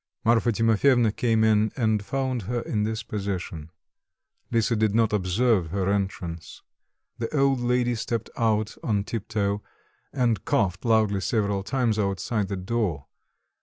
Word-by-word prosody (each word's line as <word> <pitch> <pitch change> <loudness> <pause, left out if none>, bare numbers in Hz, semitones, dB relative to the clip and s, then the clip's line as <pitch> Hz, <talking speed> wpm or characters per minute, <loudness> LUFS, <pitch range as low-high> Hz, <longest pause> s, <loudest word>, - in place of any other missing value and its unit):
Marfa 115 +1 +3
Timofyevna 115 +1 +3
came 115 -2 +2
in 110 0 +3
and 110 -4 +1
found 130 +1 -2
her 120 -1 -1
in 105 - -2
this 110 0 -3
position. 95 -7 -4 0.8
Lisa 115 0 +2
did 110 -1 +1
not 115 -2 +2
observe 100 0 +2
her 95 +3 -1
entrance. 90 -5 -4 0.6
The 115 - -2
old 135 -1 +3
lady 120 0 +1
stepped 115 0 -3
out 110 -2 0
on 105 -4 0
tip 110 0 -5
toe 100 -2 -1 0.5
and 120 -7 0
coughed 90 0 0
loudly 110 -4 +2
several 100 0 0
times 115 0 0
outside 100 +1 -1
the 100 0 -3
door. 95 -7 -2
110 Hz, 140 wpm, -25 LUFS, 100-115 Hz, 0.8 s, Marfa